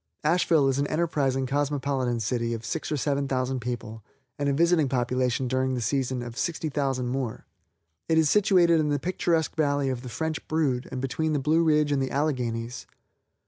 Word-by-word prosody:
Asheville 160 -2 +3
is 135 0 +1
an 145 - +1
enterprising 145 -5 0
cosmopolitan 135 -3 -1
city 115 +2 -1
of 115 - -8
six 160 -2 -3
or 150 - 0
seven 140 0 0
thousand 130 0 -1
people 115 -2 -5 0.4
and 145 0 +1
a - - +1
visiting 165 -1 +3
population 125 0 0
during 130 +1 0
the - - -2
season 130 +1 -1
of 120 -1 -8
sixty 165 -2 -2
thousand 135 -4 -1
more. 130 -3 -3 0.6
It 160 - +3
is 160 -1 +4
situated 180 -4 +4
in 150 -1 +1
the 145 - +1
picturesque 165 0 0
valley 145 -3 +1
of 130 -2 -3
the 125 - -8
French 160 +6 -3
Brood 145 -6 0
and 130 -1 -4
between 155 +4 -1
the - - +2
Blue 155 +4 +2
Ridge 150 -2 +3
and 140 -1 +1
the 135 - -1
Alleghanies. 125 -4 -2
135 Hz, 185 wpm, -26 LUFS, 125-155 Hz, 0.6 s, is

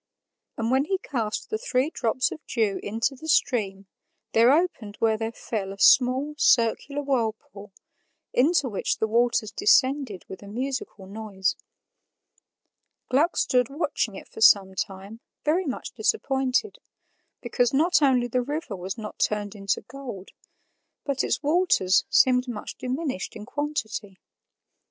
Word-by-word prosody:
And 230 +1 -1
when 265 +2 +3
he 385 +4 0
cast 240 - -4
the 435 - -1
three 285 - 0
drops 245 -1 0
of 310 - -8
dew 215 -5 0
into 225 +6 -1
the 315 +5 -10
stream, 200 -10 +1 0.5
there 230 +3 +5
opened 285 - 0
where 225 -1 +2
they 225 +1 -3
fell 215 -3 -5
a 195 - -9
small, 260 +7 +4
circular 275 +4 +2
whirlpool, 220 -6 -3 0.6
into 290 +1 +3
which 205 -5 -1
the - - +1
waters 230 -1 +1
descended 270 - +2
with 190 - -9
a 200 - -11
musical 245 -3 -4
noise. 200 -1 -2 1.5
Gluck 300 +7 +2
stood 250 -2 +2
watching 285 - -2
it - - -10
for - - -11
some 195 -3 +6
time, 195 +3 -5 0.3
very 330 +4 +1
much 260 - -4
disappointed, 270 - 0 0.6
because 240 0 0
not 320 +5 +3
only 260 -4 +3
the 250 +1 0
river 290 -4 -4
was 190 +3 -5
not 215 -2 -8
turned 210 -1 0
into 195 -2 -2
gold, 250 -9 -9 0.8
but 280 -2 0
its - - -1
waters 290 - +3
seemed 250 0 +4
much 225 -4 -6
diminished 260 - -4
in 210 -1 -8
quantity. 220 -8 -4
245 Hz, 140 wpm, -25 LUFS, 210-280 Hz, 1.5 s, some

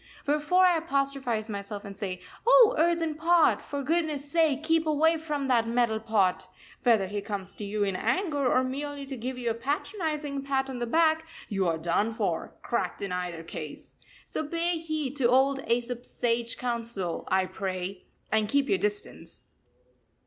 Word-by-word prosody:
Wherefore 300 +5 +3
I 355 -2 +5
apostrophise 275 -7 -1
myself 205 -1 -5
and 200 0 -8
say: 185 -3 -4 0.3
"O 485 -2 +8
Earthen 330 0 +2
Pot! 330 +2 +3
For 285 -1 -5
goodness 300 -2 -1
sake 315 -4 +2
keep 325 0 +2
away 315 +2 +4
from 300 -3 -3
that 235 -3 +3
Metal 235 -2 +1
Pot! 215 -5 +1 0.3
Whether 225 -6 +4
he 205 +2 -4
comes 200 -2 -5
to - - -8
you 205 +1 -1
in 195 -2 0
anger 290 - 0
or 255 - +3
merely 280 +2 -4
to 270 0 -6
give 255 +2 -4
you 240 -2 -1
a - - 0
patronising 290 - -3
pat 270 -1 -1
on 250 - -5
the 240 - -2
back, 320 +3 +3 0.2
you 195 -3 0
are 165 -1 +1
done 175 +7 0
for, - - -2
cracked - - -2
in 195 - -3
either 180 -2 -3
case. 155 -2 -8 0.3
So 310 - -4
pay 335 +1 0
heed 310 -4 -3
to 245 -4 +3
old 270 +2 +3
Aesop's 240 +1 -1
sage 235 -1 0
counsel, 230 -7 -3
I 190 0 +2
pray 185 0 -5 0.2
and 215 -1 +2
keep 280 -1 +2
your 390 - +3
distance." 415 0 -4
260 Hz, 170 wpm, -28 LUFS, 210-310 Hz, 0.3 s, O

